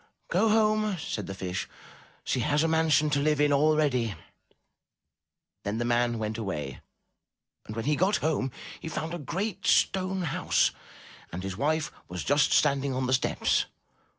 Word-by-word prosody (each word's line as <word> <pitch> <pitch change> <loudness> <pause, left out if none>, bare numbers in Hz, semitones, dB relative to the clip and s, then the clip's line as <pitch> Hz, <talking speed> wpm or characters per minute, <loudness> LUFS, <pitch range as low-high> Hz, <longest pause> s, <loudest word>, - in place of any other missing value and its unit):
"Go 225 - +3
home," 215 -2 +2
said 110 -9 -4
the 95 - -5
Fish. 90 -1 -4 0.5
"She - - -1
has 145 +6 +2
a - - +2
mansion 160 -2 +3
to 145 - +2
live 150 0 +2
in 145 -1 +4
already." 140 -7 +2 1.5
Then 100 +2 -2
the 120 - -1
man 120 0 +1
went 110 0 -3
away 75 - -4 0.9
and 110 - -6
when 115 - -3
he 150 +1 +2
got 190 +6 +2
home 145 -4 -1 0.3
he 160 - -6
found 160 +1 -4
a 175 - -4
great 190 +6 -3
stone 190 0 +2
house 150 - +1 0.6
and 90 +2 -5
his 95 -1 -4
wife 155 +7 0 0.2
was 90 0 -5
just 145 +1 +3
standing 140 -1 +2
on 130 0 -1
the 130 - +1
steps. 130 - +1
145 Hz, 160 wpm, -28 LUFS, 115-160 Hz, 1.5 s, in